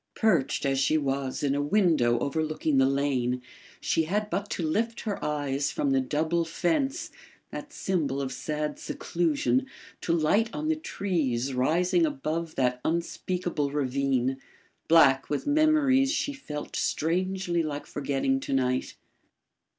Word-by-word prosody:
Perched, 170 - +2
as 135 -1 +1
she 155 +3 +3
was, 135 -2 -2
in 140 -1 +2
a 145 - 0
window 145 - +3
overlooking 155 +1 0
the 135 - +5
lane, 135 -3 0 0.4
she 160 - +1
had 210 +5 -1
but 200 +3 -2
to 175 - -3
lift 225 +8 -1
her 210 -3 -4
eyes 145 -2 -1
from 140 - 0
the 135 0 +3
double 160 +6 0
fence 270 - -1 0.4
(that - - -7
symbol 155 -8 -1
of 135 -1 -3
sad 150 +3 -3
seclusion) 140 -7 0 0.3
to - - -1
light 170 +8 +2
on 310 +1 -2
the 320 - +3
trees 155 - -1
rising 170 - +2
above 170 - -2
that 125 -1 0
unspeakable 170 -2 -1
ravine, 135 -2 0 0.5
black 135 -5 +5
with 145 - -2
memories 290 -3 +3
she 290 -2 -1
felt 150 - -7
strangely 180 +1 0
like 150 -2 -4
forgetting 145 - -1
to 270 - -4
night. 130 -1 0
155 Hz, 140 wpm, -27 LUFS, 135-190 Hz, 0.5 s, the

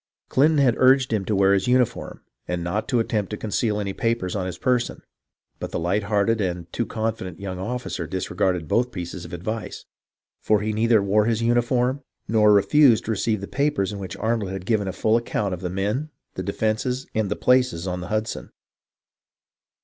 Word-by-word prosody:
Clinton 150 +4 +3
had 135 -4 +4
urged 130 -1 +4
him 100 -3 0
to 105 - 0
wear 95 0 +4
his 95 +2 +1
uniform, 125 -2 0 0.2
and 90 -1 -2
not 95 +5 -2
to 125 - +1
attempt 110 -3 -1
to 105 - -4
con 110 - -6
ceal 105 -2 0
any 100 -2 -3
papers 115 -5 -1
on 95 -2 -2
his 90 -1 -5
person; 125 +1 0 0.6
but - - -4
the - - -3
light 95 +5 0
hearted 105 +2 +1
and 90 -2 -3
too 120 - -1
confident 110 -6 -3
young 95 -2 -5
officer 105 -5 -4
disregarded 90 -2 -1
both 120 +9 +1
pieces 90 -1 -6
of 85 - -10
advice, 100 +4 -5 0.6
for 105 -1 +2
he 110 +1 -1
neither 110 -1 +3
wore 105 +2 +3
his 115 0 0
uniform 120 +3 +1 0.3
nor 105 -1 +4
refused 110 +5 +5
to 115 - -1
receive 110 -1 0
the 100 - -5
papers 140 -9 0
in 100 - -6
which 95 -2 -6
Arnold 110 -3 -1
had 95 -1 -6
given 105 -2 +1
a - - -1
full 110 +4 +2
ac 115 - -13
count 100 -3 -1
of 90 - -6
the 90 - -3
men, 105 - -2 0.2
the - - -4
defences, 125 +4 -1
and 110 -2 0
the 105 - -1
places 125 -9 +2
on 90 -1 -3
the 90 - -6
Hudson. 110 0 -3
105 Hz, 200 wpm, -23 LUFS, 95-120 Hz, 0.6 s, refused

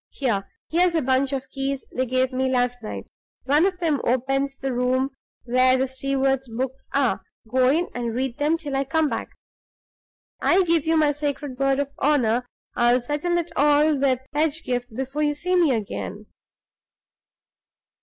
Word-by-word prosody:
Here! 210 -8 -2 0.2
here's 345 +1 +3
a 320 - +2
bunch 260 +1 +2
of 270 -1 -3
keys 270 0 -3
they 255 0 0
gave 255 +1 +1
me 260 +1 0
last 245 -1 0
night: 215 - -7 0.3
one 295 +7 +4
of 375 -2 -3
them 320 -6 0
opens 270 +2 0
the 270 -1 -3
room 255 +2 +1 0.3
where 255 +1 +3
the 265 +1 +1
steward's 270 0 -1
books 260 +3 -4
are; 275 -4 +2 0.3
go 255 +2 +3
in 325 +6 +2
and 235 -2 -3
read 255 -1 -2
them 300 +3 +2
till 290 -4 -5
I 270 - +1
come 315 +2 +1
back. - - -4 1.1
I 375 +2 +4
give 330 -3 +1
you 325 0 +3
my 305 -2 +4
sacred 290 -2 -4
word 275 0 +2
of 280 0 -2
honor 250 -4 +2 0.3
I'll 240 +1 +3
settle 295 +7 -1
it 340 0 -2
all 295 +1 +4
with 265 -2 +1
Pedgift 285 -5 -1
before 270 +4 -3
you 295 -1 +1
see 360 +5 0
me 340 -5 +4
again." 215 -2 -4
270 Hz, 165 wpm, -24 LUFS, 255-295 Hz, 1.1 s, one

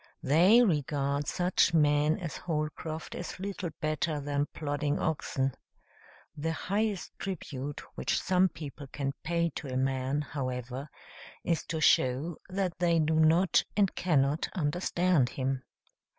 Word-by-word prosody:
They 180 - +6
regard 145 - 0
such 175 -1 +2
men 150 0 +4
as 170 -5 -5
Holcroft 155 0 -4
as 175 0 -6
little 190 -2 -4
better 155 0 -1
than 145 0 -1
plodding 145 -1 -1
oxen. 135 -4 -1 0.8
The 160 +2 -2
highest 200 +3 -1
tribute 145 -7 -5
which - - 0
some 185 0 +3
people 145 -3 -8
can 140 0 -3
pay 170 0 0
to - - -6
a 130 - -1
man, 135 +2 0
however, 130 0 -4 0.5
is 165 -2 0
to 160 - -2
show 140 +4 +3
that 185 -2 -2
they 170 -1 +3
do 160 0 +2
not 160 +4 +4
and 200 -3 +3
cannot 150 -3 +1
understand 175 -3 +1
him. 130 0 -2
155 Hz, 130 wpm, -30 LUFS, 140-175 Hz, 0.8 s, They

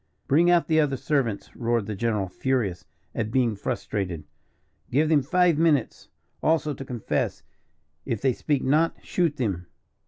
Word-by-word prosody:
"Bring 165 +5 +4
out 175 -1 +4
the 160 -1 +3
other 140 -3 +1
servants," 125 -8 -1
roared 115 -3 0
the 105 - -4
general, 105 -1 -1
furious 105 -2 -1 0.3
at 110 -2 -2
being 120 -2 +1
frustrated. 95 -4 -3 0.7
"Give 150 +5 +2
them 155 -2 +4
five 175 +2 +2
minutes, 155 -7 +1 0.3
also, 155 -2 +1
to 135 - -7
confess; 125 -4 -2 0.6
if 115 -5 -2
they 130 +2 +2
speak 145 +2 -1
not, 155 +5 +2
shoot 165 -5 0
them." 95 -8 -2
130 Hz, 150 wpm, -25 LUFS, 110-155 Hz, 0.7 s, Bring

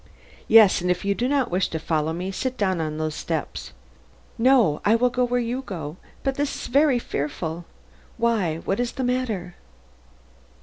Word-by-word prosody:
"Yes; 220 -5 +7
and 180 - -1
if 180 +2 0
you 200 - +2
do 240 +5 -1
not 275 -5 +1
wish 185 +2 +1
to 160 - -4
follow 160 -1 -1
me, 180 +3 -4
sit 255 +6 -3
down 190 -4 0
on 155 -1 -3
these 155 0 -2
steps 65 - -4 0.3
" 65 +2 -31
"No, 220 - +4
I 215 - +4
will 245 +1 +2
go 250 +1 +1
where 245 0 +1
you 245 +2 -2
go; 170 - -6 0.3
but 270 - +1
this 285 +1 -2
is - - -6
very 280 0 +3
fearful. 160 -3 -4 0.5
Why, 210 -9 0
what 195 - -1
is 245 -1 -1
the 260 - -3
matter?" 235 -8 -2
200 Hz, 185 wpm, -24 LUFS, 165-245 Hz, 0.5 s, Yes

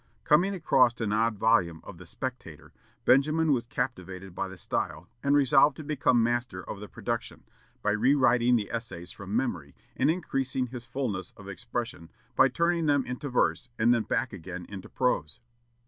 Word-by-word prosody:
Coming 175 +6 +3
across 130 -8 +3
an 105 -2 -1
odd 110 0 +1
volume 95 -7 +2
of 90 - -11
the 90 - -11
"Spectator," 120 - -7 0.3
Benjamin 155 +4 +4
was 120 -4 0
captivated 95 -7 -4
by 95 +2 -3
the 95 0 -10
style, 85 0 -3
and 140 0 +2
resolved 140 0 +5
to 155 - -7
become 130 -5 +2
master 120 -5 -2
of 100 - -6
the 105 - -8
production, - - -4 0.4
by 105 - +2
rewriting 125 +1 +4
the 105 -4 -1
essays 105 -7 -5
from 100 +1 -6
memory, 85 - -2 0.2
and 135 - +2
increasing 135 -6 -1
his 125 -1 -8
fulness 115 -8 -3
of 95 - -12
expression 115 -5 -5 0.3
by - - +6
turning 170 -1 +1
them 145 -2 +3
into 125 +3 -5
verse, 125 0 +1
and 120 +2 +4
then 120 - +2
back 115 +2 -1
again 90 -1 -7
into 100 -2 -8
prose. 120 - -1
120 Hz, 170 wpm, -28 LUFS, 100-135 Hz, 0.4 s, by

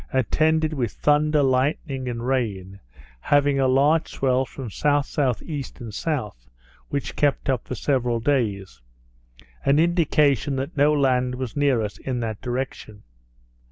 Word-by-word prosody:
attended 155 +5 +1
with 120 -8 -2
thunder, 150 0 +2
lightning, 130 0 0
and 120 0 -4
rain, 100 -7 -2 0.4
having 145 - +2
a 135 - +3
large 145 +5 +3
swell 130 -1 +1
from 135 0 -9
S.S.E. 145 - -1 0.2
and 115 - -7
S., 105 - -4 0.4
which 140 -1 -3
kept 145 0 +1
up 125 -4 -3
for 125 - -4
several 125 -5 0
days, 105 - -1 0.8
an 140 +1 +3
indication 150 - +2
that 135 +6 -4
no 145 +1 +4
land 130 -3 +1
was 125 -2 -5
near 140 -6 +2
us 105 - -6
in 130 -2 -3
that 110 -3 -4
direction. 125 -4 -5
135 Hz, 135 wpm, -23 LUFS, 120-145 Hz, 0.8 s, no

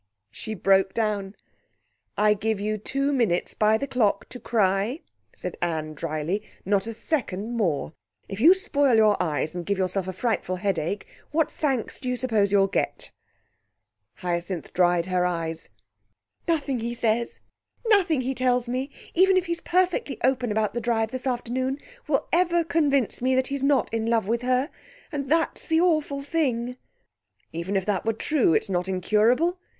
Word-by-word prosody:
She 220 - -6
broke 190 0 +3
down. 210 -3 -1 0.8
"I 210 0 +5
give 215 0 -1
you 215 +1 -2
two 275 +6 -1
minutes 220 -10 +1
by 215 0 +3
the 280 - -3
clock 225 -7 +1
to 250 - -8
cry," 210 - +1 0.3
said - - -5
Anne 160 -3 -2
dryly, 155 +5 -2 0.2
"not 200 +2 +1
a 230 - -4
second 230 - -2
more. 165 -9 0 0.3
If 195 - -6
you 340 +7 +8
spoil 285 - +2
your 215 -2 +5
eyes 155 -2 -1
and 175 -1 -4
give 200 +2 -1
yourself 185 0 -1
a 185 - -3
frightful 185 -2 -1
headache, 190 0 -2 0.2
what 315 0 +1
thanks 270 -7 -1
do 255 - -4
you 250 - -1
suppose 220 -6 +1
you'll 200 -1 +5
get?" 195 - -2 1.0
Hyacinth 175 -1 -3
dried 175 -1 +3
her 180 -1 +1
eyes. 165 -2 -2 0.8
"Nothing 285 -6 0
he 235 +1 -3
says, 230 0 0 0.5
nothing 380 - +3
he 260 +1 -2
tells 250 -1 +1
me, 255 +3 -2 0.2
even 380 +2 +5
if 370 - +1
he's 340 0 -3
perfectly 360 -5 0
open 250 -2 +1
about 215 0 0
the 240 - -2
drive 225 -1 0
this 255 0 -4
afternoon, 255 +2 -1 0.3
will - - +1
ever 345 0 +3
convince 285 -9 +1
me 260 +1 +2
that 260 0 +2
he's 280 -1 -2
not 275 -5 +2
in 225 0 -1
love 230 -4 +1
with 235 +2 0
her, 255 +4 +1 0.4
and 280 -3 -3
that's 325 +1 0
the 320 0 +3
awful 310 -5 +1
thing." 250 -6 -1 0.8
"Even 170 +5 -3
if 190 -1 +1
that 200 -3 0
were 225 - +1
true, 240 - +2
it's - - +1
not 180 -1 -1
incurable. 225 - +2
230 Hz, 165 wpm, -25 LUFS, 195-275 Hz, 1.0 s, you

